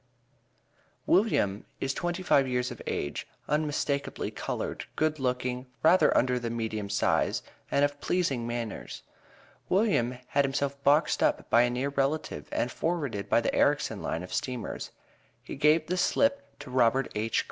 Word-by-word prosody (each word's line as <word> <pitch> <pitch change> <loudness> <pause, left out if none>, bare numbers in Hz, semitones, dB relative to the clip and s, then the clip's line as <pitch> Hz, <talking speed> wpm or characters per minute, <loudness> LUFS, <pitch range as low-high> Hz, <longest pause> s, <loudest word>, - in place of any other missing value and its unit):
William 140 - +2 0.2
is 135 0 -1
twenty 175 +4 -3
five 140 -6 +4
years 125 -1 -1
of - - -8
age, 70 - -3 0.2
unmistakably 150 -2 -1
colored, - - -4
good 155 -1 0
looking, 125 0 -2 0.2
rather 180 +4 +5
under 125 0 +2
the 120 -1 -3
medium 110 -3 -3
size, 100 - +1 0.3
and 140 - +3
of 145 0 -5
pleasing 140 -10 0
manners. 120 -2 -5 0.7
William 180 - +2
had 140 - +3
himself 140 0 -2
boxed 150 +3 +3
up - - +1
by 115 - +7
a 120 - +3
near 125 +3 -1
relative 140 +2 -2
and 125 - -1
forwarded 150 - -2
by - - +5
the - - -1
Erricson - - +2
line 85 - -3
of 90 - -8
steamers. 125 -4 -3 0.5
He - - -7
gave 155 +1 +4
the 180 +3 -2
slip 280 +8 +1
to 140 -3 -9
Robert 130 +1 +2
H. 110 +2 0
135 Hz, 150 wpm, -28 LUFS, 120-155 Hz, 0.7 s, by